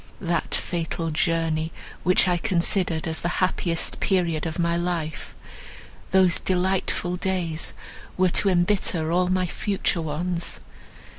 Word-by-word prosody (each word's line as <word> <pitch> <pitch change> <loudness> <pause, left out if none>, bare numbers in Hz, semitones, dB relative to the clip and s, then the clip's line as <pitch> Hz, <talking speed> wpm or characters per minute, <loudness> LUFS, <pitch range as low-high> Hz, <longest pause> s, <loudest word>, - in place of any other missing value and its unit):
That 170 -3 -1
fatal 165 -1 -2
journey! 160 0 0 0.3
which 180 +2 +3
I 180 -1 +3
considered 175 -3 +1
as 160 0 -1
the - - -1
happiest 180 -2 0
period 170 -5 +1
of 160 - -5
my 170 -1 +1
life—those 175 +2 -2
delightful 180 -1 0
days 175 -4 -2 0.4
were 185 0 +4
to 195 - +3
embitter 175 -3 +1
all 180 +1 +2
my 185 0 +1
future 185 -1 -1
ones. 170 +3 -2
175 Hz, 120 wpm, -24 LUFS, 165-185 Hz, 0.4 s, were